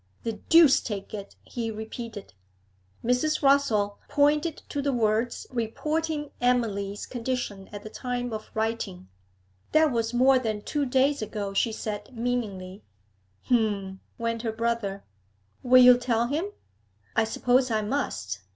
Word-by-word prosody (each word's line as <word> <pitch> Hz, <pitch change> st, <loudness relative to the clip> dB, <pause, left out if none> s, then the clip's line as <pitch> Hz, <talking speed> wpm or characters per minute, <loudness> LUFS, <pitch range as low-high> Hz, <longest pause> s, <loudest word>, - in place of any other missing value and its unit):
'The 225 Hz, -, -2 dB, 0.2 s
deuce 330 Hz, -4 st, +7 dB
take 205 Hz, -3 st, -5 dB
it!' 200 Hz, -2 st, -7 dB
he 230 Hz, -2 st, -4 dB
repeated. 220 Hz, -1 st, -7 dB, 0.7 s
Mrs. 270 Hz, +6 st, +1 dB
Rossall 230 Hz, -8 st, +3 dB
pointed 300 Hz, +2 st, +2 dB
to 285 Hz, -, -3 dB
the 280 Hz, 0 st, 0 dB
words 230 Hz, 0 st, 0 dB
reporting 295 Hz, +6 st, -2 dB
Emily's 210 Hz, -5 st, 0 dB
condition 240 Hz, -5 st, -4 dB
at 205 Hz, -1 st, -8 dB
the 215 Hz, -, -7 dB
time 245 Hz, -1 st, -3 dB
of 215 Hz, 0 st, -6 dB
writing. 220 Hz, -, -3 dB, 0.6 s
'That 310 Hz, -1 st, +5 dB
was 230 Hz, -2 st, 0 dB
more 260 Hz, +2 st, +5 dB
than 215 Hz, -4 st, -3 dB
two 290 Hz, -2 st, -1 dB
days 270 Hz, +2 st, +2 dB
ago,' 205 Hz, -2 st, -4 dB
she 225 Hz, +3 st, +2 dB
said 215 Hz, +2 st, -6 dB
meaningly. 210 Hz, -6 st, -3 dB, 0.6 s
'H'm!' 205 Hz, -5 st, 0 dB, 0.2 s
went 230 Hz, 0 st, -2 dB
her 225 Hz, -2 st, -2 dB
brother. 225 Hz, -3 st, -2 dB, 0.6 s
'Will 255 Hz, 0 st, +7 dB
you 250 Hz, 0 st, +8 dB
tell 235 Hz, -2 st, +1 dB
him?' 310 Hz, +10 st, -1 dB, 0.7 s
'I 225 Hz, -, +4 dB
suppose 250 Hz, +3 st, +2 dB
I 215 Hz, -2 st, 0 dB
must. 100 Hz, -, -2 dB
235 Hz, 135 wpm, -27 LUFS, 210-260 Hz, 0.7 s, you